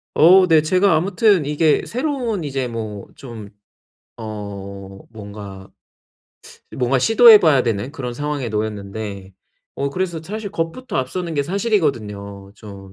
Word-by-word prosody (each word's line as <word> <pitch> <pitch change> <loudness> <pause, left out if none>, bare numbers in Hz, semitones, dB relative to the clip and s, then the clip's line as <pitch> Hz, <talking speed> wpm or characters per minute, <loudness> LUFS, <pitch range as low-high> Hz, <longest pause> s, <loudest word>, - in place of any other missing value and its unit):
어 185 +3 +6
네 160 -2 +5
제가 185 +3 +2
아무튼 200 -3 +2
이게 150 +1 +2
새로운 245 - -2
이제 135 -3 -3
뭐 110 -3 -6
좀 115 -6 -10 0.7
어 100 -2 -8
뭔가 100 -3 -10 1.1
뭔가 130 0 +1
시도해 225 - +7
봐야 145 -6 +3
되는 115 +1 -2
그런 125 -4 -6
상황에 145 -2 -3
놓였는데 105 -2 -5 0.4
어 140 0 -2
그래서 170 -1 -3
사실 205 +3 -6
겁부터 170 +11 -4
앞서는 165 +6 -3
게 140 - +1
사실이거든요. 115 - -2
좀 100 -3 -12
135 Hz, 265 characters per minute, -20 LUFS, -, 1.1 s, 시도해